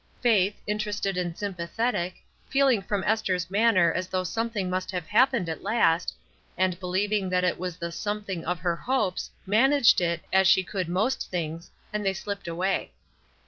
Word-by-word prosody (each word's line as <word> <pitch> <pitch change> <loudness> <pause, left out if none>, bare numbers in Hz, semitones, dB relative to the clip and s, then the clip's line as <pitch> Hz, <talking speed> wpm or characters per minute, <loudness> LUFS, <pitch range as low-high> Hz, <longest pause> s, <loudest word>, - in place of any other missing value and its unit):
Faith, 210 -5 +2
interested 210 -2 -2
and 175 -2 -2
sympathetic, 185 0 -2 0.3
feehng 270 -6 +3
from 200 0 -2
Esther's 185 -4 0
manner 200 -5 +4
as 185 0 -2
though 185 0 -1
something 225 0 -2
must 185 0 -2
have 180 -4 -3
happened 235 - +3
at 160 - -4
last, 175 -8 +2 0.4
and 185 -1 +1
believing 190 +2 0
that 180 0 +1
it 180 - +1
was 180 -1 -4
the 170 0 -4
something 205 -2 -4
of 180 - -1
her 170 +1 -1
hopes, 215 -2 -1 0.2
managed 240 +3 +4
it, 170 -1 -1
as 190 0 +5
she 190 0 +5
could 185 -2 -3
most 215 +9 0
things, 165 -2 -4 0.2
and 210 0 -1
they 195 -1 +1
slipped 200 -1 -5
away. 180 +3 -1
190 Hz, 165 wpm, -26 LUFS, 180-210 Hz, 0.4 s, as